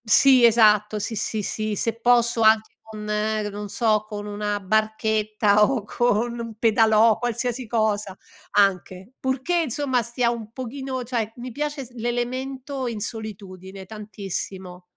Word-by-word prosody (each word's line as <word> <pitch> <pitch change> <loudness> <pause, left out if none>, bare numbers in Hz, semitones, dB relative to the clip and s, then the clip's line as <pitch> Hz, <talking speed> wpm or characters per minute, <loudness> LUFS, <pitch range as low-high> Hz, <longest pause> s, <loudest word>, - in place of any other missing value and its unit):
Sì, 255 +3 +6
esatto, 215 -2 +4
sì, 225 +2 -3
sì, 215 0 -2
sì, 215 +1 -2
se 230 +3 -1
posso 235 -1 +3
anche 220 0 +4
con 215 -1 -9
ehm, 210 0 -1
non 205 0 -6
so, 215 -1 +1
con 205 -1 -6
una 205 0 -3
barchetta 215 0 +1
o 230 0 +1
con 240 +1 0
un 230 -1 -6
pedalò, 220 0 +4
qualsiasi 245 +1 -2
cosa 210 -3 -1 0.4
anche, 190 0 +1
purché 265 +7 -1
insomma 260 -2 0
stia 235 +1 0
un 225 -2 -7
pochino 260 +1 -5
cioè 230 -3 -3
mi 245 +1 -7
piace 290 +1 -4
s 245 - -16
l'elemento 255 +3 -3
in 230 -3 -4
solitudine 195 -3 -7
tantissimo. 195 -3 -6
220 Hz, 140 wpm, -23 LUFS, 210-240 Hz, 0.4 s, Sì